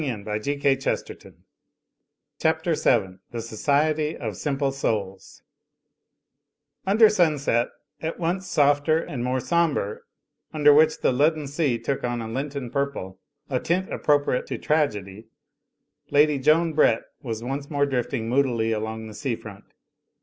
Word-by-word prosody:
Digitized 120 -9 -4
by 105 0 -2
CjOOQ 140 +1 0
IC - - -14 1.1
CHAPTER - - +1
VII 95 0 +1
THE 120 - -5
SOCIETY 150 +7 0
OF - - -5
SIMPLE 140 -2 -1
SOULS 100 -8 -3 1.4
Under 215 +3 +6
sirnset, 150 - +2 0.3
at 160 +1 -3
once 180 +3 -2
softer 145 +1 +3
and 135 -6 -4
more 130 +1 0
sombre, 160 - 0 0.5
under 150 -2 +5
which 155 +2 +4
the - - +3
leaden 150 +4 +2
sea 140 -3 0
took 115 +4 -3
on 120 -1 -1
a 115 - -5
Lenten 135 +1 -4
purpl^, 140 -10 -3 0.3
a 130 -2 -1
tint 185 +6 -1
appropriate 145 -4 +1
to - - -4
tragedy, 110 -9 -1 0.8
Lady 145 0 +4
Joan 155 +4 +3
Brett 115 -7 +3 0.2
was 115 -5 -5
once 140 +3 -4
more 145 -1 +1
drifting 125 -3 -2
moodily 120 -3 +1
along 110 0 -3
the 110 - -9
sea 130 +1 -2
front. 105 -3 -12
140 Hz, 135 wpm, -24 LUFS, 115-150 Hz, 1.4 s, Under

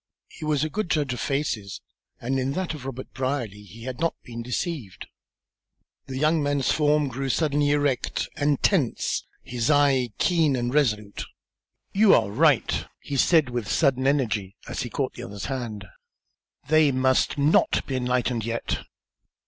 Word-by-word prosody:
He - - -11
was 150 -1 +1
a 155 - -1
good 215 -4 -2
judge 145 -4 +1
of 125 - -5
faces, 120 -9 -2 0.4
and 135 +3 -1
in 130 +1 -1
that 185 0 -2
of 135 -4 -7
Robert 130 -1 -7
Brierly 130 -6 -2
he 110 +3 -13
had 130 +2 -5
not 165 0 0
been 120 -1 -7
deceived. 125 - -4 1.0
The 130 -1 -5
young 155 +3 +2
man's 145 -2 +1
form 150 -1 +2
grew 135 +1 -3
suddenly 145 0 +1
erect 145 -3 0
and 145 -1 +1
tense, 155 - +1 0.2
his 120 0 -2
eye 140 -4 +4
keen 160 -6 +3
and 120 0 -2
resolute. 105 -8 0 0.7
"You 205 +1 +6
are 100 - +1
right!" 145 +3 +2
he 145 - -5
said, 150 -1 +4
with 120 -4 -3
sudden 135 -4 +2
energy, 110 -9 0
as - - -4
he - - -4
caught - - -2
at - - -20
the - - -6
other's 100 +1 -6
hand. 120 -7 -4 0.8
"They 155 -1 +5
must 130 +1 +2
not 145 +2 +3
be 135 - -3
enlightened 125 -2 0
yet." 115 +1 -2
135 Hz, 165 wpm, -25 LUFS, 120-150 Hz, 1.0 s, You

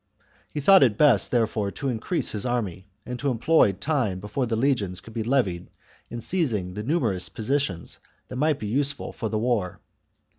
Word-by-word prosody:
He 150 - -3
thought 195 +7 +7
it 115 -6 +4
best, 130 -8 +4
therefore, 110 -4 0
to 140 - -4
increase 125 +8 -1
his 105 - -2
army, 105 -7 -2 0.2
and 125 0 -5
to 140 - 0
employ 130 +6 +4
the 95 - -12
time 120 -6 -1
before 110 +6 -3
the 115 - -1
legions 110 -7 0
could 115 - -13
be 115 - -2
levied 110 -8 0 0.4
in 120 - -6
seizing 115 - -1
the 105 - -5
numerous 115 - 0
positions 110 - -2 0.3
that 125 - -7
might 150 +1 +2
be - - -6
useful 140 +7 0
for 110 - -4
the 110 - -1
war. 110 -5 -1
115 Hz, 185 wpm, -25 LUFS, 105-140 Hz, 0.4 s, thought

